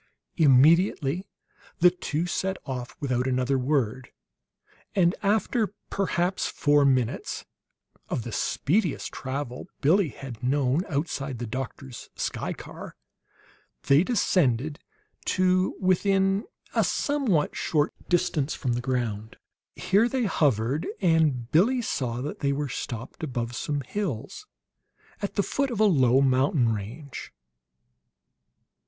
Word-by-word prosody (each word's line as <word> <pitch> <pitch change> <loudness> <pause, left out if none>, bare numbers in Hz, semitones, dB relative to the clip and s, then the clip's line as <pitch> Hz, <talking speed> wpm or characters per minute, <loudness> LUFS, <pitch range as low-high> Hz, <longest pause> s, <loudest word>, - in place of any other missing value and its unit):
Immediately 160 +3 +4 0.5
the 180 +1 +6
two 175 -2 -2
set 190 +1 -1
off 125 -2 -5
without 130 -2 0
another 130 +1 +1
word; 130 -2 0 0.9
and 175 -3 +4
after 215 +1 +1 0.2
perhaps 185 -1 0
four 145 0 +3
minutes 130 -4 0 0.6
of - - -2
the - - -6
speediest 180 0 0
travel 130 -1 -5
Billie 165 +4 +3
had 125 -3 -9
known 135 +4 +1
outside 140 -3 -2
the 120 - -4
doctor's 130 +1 -6
sky - - -3
car, - - -9 0.9
they 140 +4 +5
descended 155 - +1 0.5
to 185 0 +2
within 195 +1 +2 0.3
a - - +3
somewhat 265 - +1
short 150 -2 0 0.2
distance 170 -5 +1
from 125 -3 -1
the 120 - -1
ground. 120 -4 -2 0.4
Here 210 +5 +2
they 260 0 0
hovered, 140 - +1
and 155 - +2
Billie 235 +10 +3
saw 125 - -2
that 150 - -5
they 140 0 +1
were 145 0 -2
stopped 120 +4 -6
above 120 -4 -3
some 145 +4 -2
hills 195 - -4 0.7
at 200 - -3
the 200 - +2
foot 275 +6 -1
of 235 -4 -4
a - - +5
low 135 - +4
mountain 130 -2 +3
range. 115 +8 -7
145 Hz, 120 wpm, -26 LUFS, 130-185 Hz, 0.9 s, the